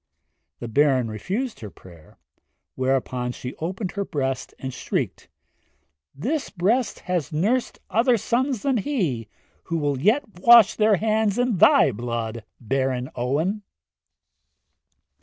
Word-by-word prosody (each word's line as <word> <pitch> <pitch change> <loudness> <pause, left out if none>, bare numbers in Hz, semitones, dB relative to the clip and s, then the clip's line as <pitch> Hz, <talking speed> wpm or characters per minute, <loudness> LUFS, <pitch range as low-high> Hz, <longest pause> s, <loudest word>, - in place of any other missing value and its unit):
The 120 - -6
Baron 130 -1 +2
refused 200 - -4
her 105 - -7
prayer, 85 -5 -17 0.6
whereupon 130 -1 -1
she 125 +1 -7
opened 180 +3 -4
her 200 - -2
breast 135 -8 -3
and 130 -1 -6
shrieked, - - -3 0.9
'This 270 - -2
breast 215 +6 0
has 175 -6 -2
nursed 215 +11 0
other 235 +2 +3
sons 245 +2 -1
than 270 -3 +1
he, 180 - -1 0.4
who 165 - -2
will 145 -3 -1
yet 220 - +3 0.2
wash 235 -1 +7
their 215 -1 +3
hands 215 +1 +1
in 245 -4 +1
thy 270 - +6
blood, 115 0 -4 0.2
Baron 130 +1 -1
Owen!' 150 - -1
170 Hz, 120 wpm, -23 LUFS, -, 0.9 s, wash